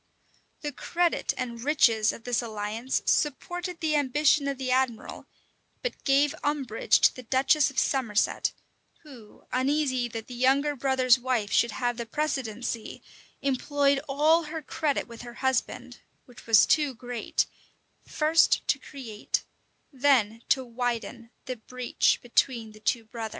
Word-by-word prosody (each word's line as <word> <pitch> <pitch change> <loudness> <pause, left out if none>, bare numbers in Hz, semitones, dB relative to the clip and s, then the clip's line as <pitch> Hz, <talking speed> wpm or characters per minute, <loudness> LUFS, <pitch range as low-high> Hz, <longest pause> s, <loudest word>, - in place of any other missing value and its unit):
The 295 - -3
credit 345 +5 0
and 235 -2 -4
riches 230 -7 +3
of 230 - -11
this 245 0 0
alliance 220 +2 -3
supported 355 +4 -1
the 310 -2 +1
ambition 290 +1 +2
of 275 -1 -2
the 255 -1 -3
admiral, 255 -3 -1 0.6
but - - -4
gave 280 +1 +3
umbrage 275 -6 +1
to - - +5
the 255 - -8
duchess 270 +4 +3
of 275 - -14
Somerset, 240 -7 +1 0.5
who, 245 -9 -15
uneasy 260 -1 +1
that 225 -1 -7
the 250 - -10
younger 270 +4 +2
brother's 260 -1 +3
wife 245 -5 -1
should 235 - +3
have 245 -1 -1
the 235 -1 -5
precedency, 240 -5 -3 0.4
employed 275 +1 +1
all 310 +4 +3
her 315 0 -6
credit 290 0 -1
with 235 -1 -10
her 240 -1 -10
husband, 265 0 -2 0.3
which 245 -2 -16
was 225 -2 +7
too 295 -4 +2
great, 245 -1 -2 0.6
first 315 +2 +2
to - - +2
create, 235 -7 -4 0.5
then 250 -5 +2
to 265 -1 +2
widen 235 -1 -4 0.2
the 255 -2 -5
breach 250 +2 0
between 235 -2 0
the 215 - -15
two 225 +1 -1
brothers. 225 -1 -6
255 Hz, 140 wpm, -27 LUFS, 235-285 Hz, 0.6 s, was